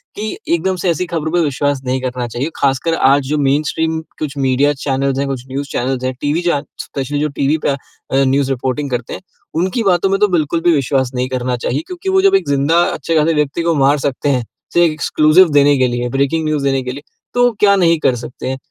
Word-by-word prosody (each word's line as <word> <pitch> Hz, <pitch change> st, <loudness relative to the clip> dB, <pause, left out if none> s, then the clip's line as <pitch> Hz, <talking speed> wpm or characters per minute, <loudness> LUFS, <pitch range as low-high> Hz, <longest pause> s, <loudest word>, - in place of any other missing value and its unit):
कि 215 Hz, -, -4 dB, 0.2 s
एक 170 Hz, -, +1 dB
दम 190 Hz, 0 st, 0 dB
से 180 Hz, -, +1 dB
ऐसी 170 Hz, +2 st, 0 dB
खबरों 160 Hz, -2 st, -3 dB
पे 175 Hz, -, +2 dB
विश्वास 145 Hz, -1 st, -1 dB
नहीं 130 Hz, +1 st, -1 dB
करना 125 Hz, -1 st, -3 dB
चाहिए। 125 Hz, +7 st, -3 dB
खासकर 140 Hz, +4 st, 0 dB
आज 140 Hz, -1 st, +4 dB
जो 150 Hz, -, 0 dB
मेनस्ट्रीम 155 Hz, +3 st, 0 dB, 0.2 s
कुछ 150 Hz, -2 st, -4 dB
मीडिया 135 Hz, +2 st, +2 dB
चैनल्स 135 Hz, -1 st, -1 dB
हैं, 140 Hz, -, -1 dB
कुछ 130 Hz, -2 st, -4 dB
न्यूज़ 140 Hz, +2 st, -4 dB
चैनल्स 130 Hz, +1 st, -2 dB
हैं, 130 Hz, 0 st, -1 dB
टीवी 150 Hz, +4 st, 0 dB
चे 170 Hz, -5 st, 0 dB, 0.2 s
स्पेशली 140 Hz, +1 st, -4 dB
जो 150 Hz, -, +1 dB
टीवी 140 Hz, +3 st, +2 dB
पे -, -, +3 dB
अ, 140 Hz, -, +1 dB, 0.4 s
न्यूज़ 135 Hz, 0 st, +2 dB
रिपोर्टिंग 130 Hz, +2 st, -2 dB
करते 125 Hz, -1 st, -3 dB
हैं, -, -, -7 dB, 0.3 s
उनकी 185 Hz, +8 st, 0 dB
बातों 190 Hz, -1 st, +2 dB
में 195 Hz, 0 st, +1 dB
तो 210 Hz, -, +4 dB
बिल्कुल 165 Hz, -2 st, 0 dB
भी 175 Hz, -, +3 dB
विश्वास 135 Hz, -2 st, 0 dB
नहीं 125 Hz, +1 st, -1 dB
करना 125 Hz, -1 st, -2 dB
चाहिए। 125 Hz, +4 st, -2 dB
क्योंकि 365 Hz, +1 st, -5 dB
वो 380 Hz, 0 st, +3 dB
जब 390 Hz, 0 st, +4 dB
एक 385 Hz, -, +1 dB
जिंदा 145 Hz, +5 st, +3 dB
अच्छे-खासे 160 Hz, +2 st, +1 dB
व्यक्ति 150 Hz, +2 st, 0 dB
को 170 Hz, -1 st, +1 dB
मार 140 Hz, +1 st, +3 dB
सकते 140 Hz, +1 st, -1 dB
हैं, 130 Hz, -3 st, +1 dB, 0.3 s
सिर्फ़ 175 Hz, -2 st, +4 dB
एक्सक्लूसिव 155 Hz, +3 st, +4 dB
देने 145 Hz, 0 st, +4 dB
के 130 Hz, -1 st, +3 dB
लिए, 120 Hz, 0 st, -2 dB
ब्रेकिंग 140 Hz, +5 st, 0 dB
न्यूज़ 155 Hz, -2 st, -1 dB
देने 135 Hz, -1 st, +1 dB
के 125 Hz, -, -4 dB
लिए, 140 Hz, +3 st, -9 dB, 0.3 s
तो 245 Hz, 0 st, +3 dB
क्या 200 Hz, -1 st, +5 dB
नहीं 170 Hz, -4 st, +3 dB
कर 130 Hz, -, +2 dB
सकते 120 Hz, +2 st, -7 dB
हैं। 130 Hz, -, -3 dB
145 Hz, 230 wpm, -16 LUFS, 130-165 Hz, 0.4 s, क्या